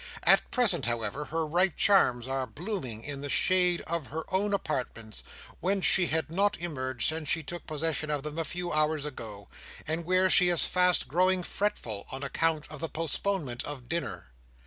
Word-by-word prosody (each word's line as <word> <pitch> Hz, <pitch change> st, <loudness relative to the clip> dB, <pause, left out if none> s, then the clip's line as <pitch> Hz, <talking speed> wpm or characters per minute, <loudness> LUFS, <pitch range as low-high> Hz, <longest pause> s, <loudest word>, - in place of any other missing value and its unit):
At -, -, +4 dB
present, 225 Hz, -, +3 dB
however, 120 Hz, +4 st, -2 dB
her 160 Hz, +1 st, -2 dB
ripe 175 Hz, +3 st, +1 dB
charms 125 Hz, -, +3 dB
are 135 Hz, -1 st, -2 dB
blooming 140 Hz, -, -6 dB
in 140 Hz, -2 st, -6 dB
the 145 Hz, -, -5 dB
shade 180 Hz, +2 st, +5 dB
of 165 Hz, -4 st, -4 dB
her 160 Hz, +2 st, -5 dB
own 200 Hz, +2 st, +1 dB
apartments, 125 Hz, -, -3 dB, 0.4 s
whence 190 Hz, +1 st, -1 dB
she 180 Hz, -2 st, +5 dB
had 160 Hz, +1 st, -1 dB
not 200 Hz, +4 st, +1 dB
emerged 130 Hz, -7 st, -1 dB
since 160 Hz, -1 st, -1 dB
she 165 Hz, -, +2 dB
took 175 Hz, +4 st, -7 dB
possession 155 Hz, 0 st, -2 dB
of 145 Hz, -2 st, -2 dB
them 150 Hz, +2 st, -5 dB
a -, -, 0 dB
few 175 Hz, +2 st, -4 dB
hours 155 Hz, -1 st, +1 dB
ago, 110 Hz, -8 st, -8 dB, 0.4 s
and 160 Hz, +2 st, -2 dB
where 185 Hz, +2 st, +2 dB
she 180 Hz, -1 st, +6 dB
is 175 Hz, -2 st, +4 dB
fast 180 Hz, -1 st, +2 dB
growing 180 Hz, +4 st, +2 dB
fretful, 120 Hz, -, -3 dB
on 135 Hz, +1 st, -6 dB
account 155 Hz, +2 st, 0 dB
of 155 Hz, -, -8 dB
the 165 Hz, -, -4 dB
postponement 160 Hz, -4 st, -3 dB
of 135 Hz, -4 st, -8 dB
dinner. 165 Hz, -, -4 dB
160 Hz, 180 wpm, -28 LUFS, 135-180 Hz, 0.4 s, she